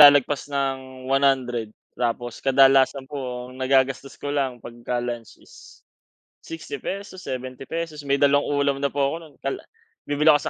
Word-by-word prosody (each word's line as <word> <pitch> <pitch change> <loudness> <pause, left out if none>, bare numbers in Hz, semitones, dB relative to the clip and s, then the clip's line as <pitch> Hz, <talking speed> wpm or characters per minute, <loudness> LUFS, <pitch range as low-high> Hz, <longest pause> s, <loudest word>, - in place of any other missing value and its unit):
lalagpas 145 -1 +7
ng 130 -2 -3
100. 130 -4 +2 0.2
Tapos 120 0 -2
kadalasan 135 0 +5
po 125 -3 -5
ang 130 - -12
nagagastos 135 +1 +2
ko 145 - -4
lang 130 -4 -1
pagka 120 +1 -3
lunch 120 -2 -5
is - - -17 0.6
60 160 -4 -7
pesos, 195 -1 -5
70 130 -1 -5
pesos 160 0 -4
may 140 0 +1
dalawang 145 0 +4
ulam 140 -1 +2
na 140 - +2
po 140 -1 +1
ako 140 - -1
no'n. 155 -3 -15
Tala 135 - -3 0.4
bibili 150 +2 +4
ako 145 - +3
135 Hz, 155 wpm, -24 LUFS, 130-145 Hz, 0.6 s, lalagpas